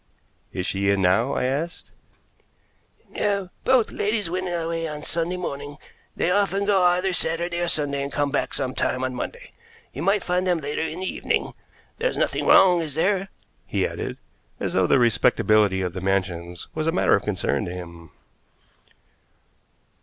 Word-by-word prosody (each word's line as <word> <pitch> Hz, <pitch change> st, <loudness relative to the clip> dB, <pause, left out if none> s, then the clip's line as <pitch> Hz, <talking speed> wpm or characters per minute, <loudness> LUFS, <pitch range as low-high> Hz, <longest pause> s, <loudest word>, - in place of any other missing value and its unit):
"Is 90 Hz, -, -3 dB
she 100 Hz, +1 st, 0 dB
in 100 Hz, -1 st, +2 dB
now?" 100 Hz, +9 st, +3 dB
I -, -, 0 dB
asked. 145 Hz, +7 st, -3 dB, 1.2 s
"No; 200 Hz, -3 st, -1 dB
both 255 Hz, -4 st, +3 dB
ladies 205 Hz, -4 st, -1 dB
went 185 Hz, +1 st, -2 dB
away 165 Hz, -1 st, -2 dB
on 150 Hz, -1 st, -6 dB
Sunday 170 Hz, +2 st, -1 dB
morning. 145 Hz, -4 st, -5 dB, 0.4 s
They 175 Hz, -, +1 dB
often 200 Hz, 0 st, +1 dB
go 200 Hz, -2 st, +3 dB
either 180 Hz, +1 st, +3 dB
Saturday 170 Hz, +1 st, -1 dB
or 175 Hz, -, 0 dB
Sunday, 145 Hz, -3 st, 0 dB
and 140 Hz, 0 st, -4 dB
come 145 Hz, -1 st, 0 dB
back 140 Hz, -, -1 dB
some 130 Hz, -2 st, -2 dB
time 130 Hz, 0 st, -1 dB
on 130 Hz, 0 st, -1 dB
Monday. 125 Hz, -, -6 dB, 0.4 s
You 140 Hz, -, -5 dB
might 195 Hz, +3 st, +2 dB
find 180 Hz, +1 st, 0 dB
them 180 Hz, -1 st, +3 dB
later 145 Hz, -1 st, -3 dB
in 160 Hz, +2 st, -3 dB
the -, -, -2 dB
evening. -, -, -1 dB, 0.5 s
There's -, -, 0 dB
nothing -, -, 0 dB
wrong, 180 Hz, -3 st, +6 dB
is 150 Hz, -4 st, -5 dB
there?" 195 Hz, +4 st, +1 dB, 0.4 s
he -, -, 0 dB
added, -, -, -4 dB, 0.4 s
as -, -, -2 dB
though 95 Hz, -1 st, +3 dB
the -, -, +4 dB
respectability 110 Hz, -5 st, +3 dB
of 90 Hz, -2 st, -2 dB
the 95 Hz, -, -5 dB
Mansions 90 Hz, -3 st, -2 dB
was 155 Hz, 0 st, -2 dB
a -, -, +3 dB
matter 180 Hz, -, +3 dB
of 100 Hz, -, +4 dB
concern 105 Hz, +1 st, -1 dB
to 90 Hz, -, -5 dB
him. 85 Hz, -2 st, -9 dB
155 Hz, 170 wpm, -24 LUFS, 105-180 Hz, 1.2 s, wrong